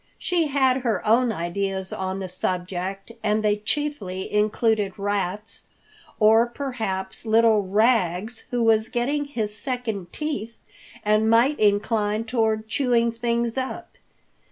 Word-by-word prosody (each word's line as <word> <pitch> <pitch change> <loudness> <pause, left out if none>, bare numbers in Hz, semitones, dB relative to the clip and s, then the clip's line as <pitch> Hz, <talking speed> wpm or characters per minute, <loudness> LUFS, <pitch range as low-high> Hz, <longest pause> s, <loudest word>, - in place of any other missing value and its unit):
She 345 -3 0
had 265 -2 +2
her 230 -7 -1
own 235 +2 +4
ideas 190 +1 -3
on 190 0 -3
the 190 -1 -4
subject 185 +2 -3
and 215 0 +1
they 210 -1 +2
chiefly 210 -6 -3
included 210 -1 +1
rats, 205 +1 -3 0.6
or 225 +2 +5
perhaps 225 -8 -4
little 225 -1 +4
Rags 210 +1 +1
who 245 -2 0
was 225 -1 +3
getting 285 +5 -1
his 220 -7 -3
second 220 -8 -4
teeth 235 -7 -4 0.5
and 215 +1 +3
might 240 +6 +4
incline 210 +1 +1
toward 220 -2 0
chewing 235 -1 +2
things 235 +1 -1
up. 260 - -6
220 Hz, 125 wpm, -24 LUFS, 200-240 Hz, 0.6 s, or